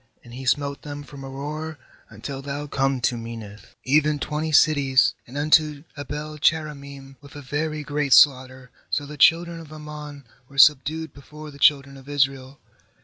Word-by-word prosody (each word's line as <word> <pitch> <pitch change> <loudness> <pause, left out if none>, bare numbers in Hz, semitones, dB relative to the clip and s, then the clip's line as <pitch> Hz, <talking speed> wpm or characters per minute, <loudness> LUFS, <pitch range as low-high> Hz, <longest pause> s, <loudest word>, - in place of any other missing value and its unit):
83And 120 - -13
he 130 +2 -8
smote 140 +3 0
them 145 -1 -8
from 140 -1 -12
Aroer 150 +4 -6 0.3
until 135 -1 -7
thou 145 +1 -5
come 135 -2 -1
to 120 - +1
Min 115 0 -7
nith, 100 -2 -14
even 150 +2 +2
twenty 150 +2 -3
cities, 140 -6 +4
and 130 +4 -9
unto 150 0 +2
Abel 150 +1 -6
cheramim, 140 -3 -2
with 145 +1 -15
a 145 - -8
very 150 +3 -3
great 145 -1 0
slaughter. 130 -2 +4 0.2
So 145 - -1
the 150 +1 -9
children 170 +3 +3
of 160 -2 -12
Ammon 150 -2 -9 0.3
were 140 - -15
subdued 155 +3 +4
before 150 +2 -12
the 140 - -15
children 140 -1 +3
of 135 +1 -14
Israel. 135 -1 -1
145 Hz, 165 wpm, -23 LUFS, 135-150 Hz, 0.3 s, cities